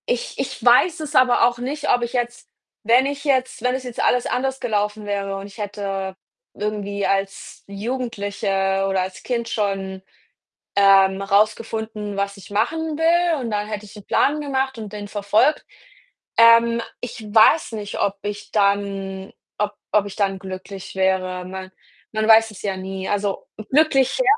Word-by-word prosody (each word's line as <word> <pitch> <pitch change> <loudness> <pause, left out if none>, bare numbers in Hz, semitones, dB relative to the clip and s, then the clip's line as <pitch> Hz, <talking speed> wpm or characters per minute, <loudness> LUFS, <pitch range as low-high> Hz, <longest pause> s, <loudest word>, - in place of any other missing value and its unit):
Ich 245 - -1
ich 270 -3 -4
weiß 250 +9 +5
es 305 - -6
aber 250 -2 +5
auch 240 0 -2
nicht, 285 +4 -3
ob 245 - +4
ich 235 0 -3
jetzt 240 -1 -3 0.4
wenn 240 +4 +4
ich 280 0 -3
jetzt 260 -3 0
wenn 250 +1 +1
es 260 - -4
jetzt 250 -2 -5
alles 250 -1 +2
anders 265 +1 -1
gelaufen 210 -2 -1
wäre 200 -1 -2
und 195 - -7
ich 200 - -15
hätte 195 -2 -4 0.4
irgendwie 205 -1 -3
als 195 0 -2
Jugendliche 200 -3 -2
oder 190 -1 +1
als 185 0 -8
Kind 235 -2 -2
schon, 195 -3 -2 0.7
ähm, 195 -1 +5
rausgefunden, 215 +1 0
was 200 0 -2
ich 195 - -13
machen 320 +9 -1
will 335 0 +3
und 235 -3 -4
dann 210 0 -2
hätte 210 -1 -5
ich 205 - -13
'n 205 - -11
Plan 300 +2 +2
gemacht 265 -3 -1
und 215 -2 -7
den 205 -1 -6
verfolgt. 205 +7 +2 0.7
Ähm, 230 0 +6 0.2
ich 245 -1 -7
weiß 225 +7 +5
nicht, 210 -1 -5
ob 200 0 0
ich 205 0 -6
dann 200 -1 0 0.3
ob 210 0 0 0.2
ob 210 -1 +3
ich 200 - -8
dann 195 -2 0
glücklich 190 0 -8
wäre. 185 -1 0
Man 190 0 -7 0.4
man 215 0 0
weiß 225 0 +7
es 195 - -12
ja 195 -2 -2
nie. 190 0 -5
Also 205 -1 -1 0.2
glücklich, 270 -3 +3
ja, - - +2
210 Hz, 165 wpm, -22 LUFS, 195-245 Hz, 0.7 s, weiß